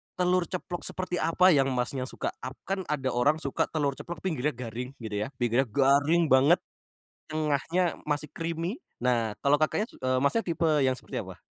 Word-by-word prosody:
telur 180 0 +2
ceplok 180 -1 -4
seperti 185 -1 -3
apa 165 +3 +2
yang 135 -4 +4
Masnya 125 +1 0
suka? - - -1
Ap 130 - -6
kan 195 0 0
ada 135 -3 -1
orang 125 +6 +2
suka 140 - +1
telur 145 -3 -1
ceplok 170 -2 -7
pinggirnya 150 -6 -1
garing 125 +2 -6
gitu 110 - -6
ya, - - -4
pinggirnya 120 +1 +1
garing 140 +7 +3
banget, 135 +6 +6 0.7
tengahnya 155 +3 0 0.2
masih 150 0 0
creamy. 165 - -4 0.2
Nah, 115 -4 +1
kalo 145 +1 +4
Kakaknya 155 +8 0
eee, 130 0 -1
Masnya 185 +11 +3
tipe 165 -1 0 0.2
yang 130 - +2
seperti - - -5
apa? - - -10
145 Hz, 170 wpm, -27 LUFS, 130-170 Hz, 0.7 s, banget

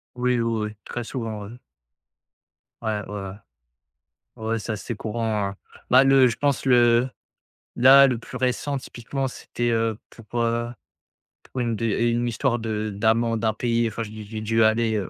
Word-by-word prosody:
Oui, 125 0 +1
oui, 115 -1 0
oui. 105 - -10
Très 120 - -4
souvent, 115 -4 -5
ouais. 110 +4 -10 1.2
Ouais, 110 -2 -1
ouais, 105 - -8
ouais. 95 - -6 1.1
Ouais, 115 +1 -2
c'est 110 +1 -4
assez 110 +3 -5
courant, 110 -1 -2
hein. 100 - -11 0.3
Bah, 130 +2 +7
le 135 -1 +6
je 115 -1 0
pense 140 -2 0
le 120 -1 +4 0.7
là, 135 +3 +8
le 125 -3 0
plus 115 - -11
récent, 130 +3 -1
typiquement, 135 +1 -4
c'était, 120 -1 -3
heu, 115 -1 0 0.3
pour, 120 - -1
heu, 115 0 0 0.7
pour 130 - -7
une 115 -1 0
d 115 +2 +1
une 120 +1 0
histoire 120 +1 0
de 110 -1 -2
d'amende 115 +2 +1
impayée. 115 +1 +1
Enfin, 110 +2 -5
j'ai 105 - -9
dû 110 -1 -8
j'ai 110 +1 -6
dû 115 +1 +2
aller, 110 0 +2
heu 100 -4 -2
115 Hz, 170 wpm, -24 LUFS, 110-120 Hz, 1.2 s, là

